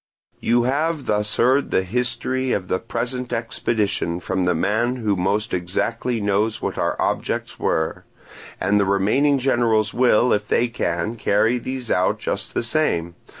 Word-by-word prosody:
"You 120 Hz, +1 st, +2 dB
have 150 Hz, +3 st, 0 dB
thus 105 Hz, 0 st, 0 dB
heard 130 Hz, +4 st, +3 dB
the 95 Hz, -, +2 dB
history 125 Hz, +4 st, -1 dB
of 95 Hz, -2 st, -3 dB
the 95 Hz, -, +1 dB
present 125 Hz, +1 st, -4 dB
expedition 110 Hz, -6 st, -1 dB
from 95 Hz, +1 st, -1 dB
the 90 Hz, -1 st, +2 dB
man 110 Hz, +8 st, +1 dB
who 110 Hz, -5 st, 0 dB
most 100 Hz, +5 st, -1 dB
exactly 115 Hz, +7 st, -1 dB
knows 105 Hz, +2 st, 0 dB
what -, -, -3 dB
our -, -, -1 dB
objects -, -, -2 dB
were; 80 Hz, 0 st, -1 dB, 0.5 s
and 100 Hz, +2 st, +2 dB
the 100 Hz, -, +3 dB
remaining 105 Hz, +10 st, +2 dB
generals 120 Hz, -5 st, +1 dB
will, 125 Hz, -1 st, +4 dB
if 105 Hz, 0 st, -1 dB
they 120 Hz, +3 st, +2 dB
can, 110 Hz, 0 st, -2 dB
carry 110 Hz, +4 st, +2 dB
these 130 Hz, -1 st, -5 dB
out 90 Hz, -, +2 dB
just -, -, -4 dB
the -, -, 0 dB
same. 115 Hz, -, 0 dB
115 Hz, 155 wpm, -22 LUFS, 100-125 Hz, 0.5 s, will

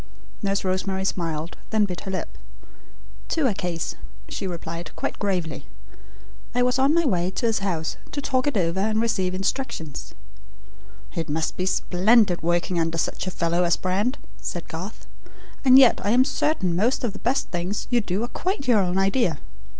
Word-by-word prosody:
Nurse 200 Hz, -1 st, 0 dB
Rosemary 190 Hz, +1 st, -1 dB
smiled, 165 Hz, -3 st, -2 dB
then 215 Hz, -1 st, +3 dB
bit 180 Hz, -3 st, -5 dB
her 195 Hz, -, -6 dB
lip. 190 Hz, -, -4 dB, 0.9 s
"To 320 Hz, -4 st, +1 dB
a 240 Hz, -, +3 dB
case," 175 Hz, -3 st, -3 dB, 0.3 s
she 195 Hz, -, -4 dB
replied 170 Hz, -1 st, -5 dB
quite -, -, -3 dB
gravely. 180 Hz, -6 st, -2 dB, 0.9 s
"I 245 Hz, -, +4 dB
was 250 Hz, +1 st, +2 dB
on 275 Hz, +4 st, +4 dB
my 335 Hz, -1 st, +3 dB
way 180 Hz, -8 st, +1 dB
to 190 Hz, -, -2 dB
his 225 Hz, -1 st, +2 dB
house 170 Hz, -5 st, -2 dB
to 290 Hz, -, -3 dB
talk 265 Hz, -1 st, 0 dB
it 285 Hz, -, +1 dB
over 170 Hz, 0 st, +1 dB
and 215 Hz, +2 st, +1 dB
receive 190 Hz, -5 st, +1 dB
instructions." 195 Hz, -, -3 dB, 1.0 s
"It 165 Hz, -2 st, -3 dB
must 160 Hz, +2 st, -1 dB
be 185 Hz, -, -1 dB
splendid 190 Hz, +1 st, +3 dB
working 175 Hz, +1 st, +1 dB
under 165 Hz, 0 st, 0 dB
such 165 Hz, -, -2 dB
a -, -, +2 dB
fellow 170 Hz, 0 st, +1 dB
as 170 Hz, -1 st, +3 dB
Brand," 205 Hz, +8 st, 0 dB, 0.2 s
said 175 Hz, -, -4 dB
Garth; 180 Hz, +6 st, -7 dB, 0.6 s
"and 260 Hz, -1 st, +8 dB
yet 260 Hz, -3 st, +7 dB
I 205 Hz, -, +1 dB
am 250 Hz, +4 st, +5 dB
certain 230 Hz, -, 0 dB
most 230 Hz, +10 st, +1 dB
of 230 Hz, -5 st, -1 dB
the 200 Hz, -, -9 dB
best 260 Hz, +4 st, 0 dB
things 180 Hz, +3 st, -2 dB
you 240 Hz, -1 st, +4 dB
do 200 Hz, +1 st, -1 dB
are -, -, -1 dB
quite 355 Hz, -1 st, -3 dB
your 235 Hz, -4 st, +5 dB
own 180 Hz, -1 st, +1 dB
idea. 195 Hz, -, +2 dB
190 Hz, 180 wpm, -24 LUFS, 175-235 Hz, 1.0 s, and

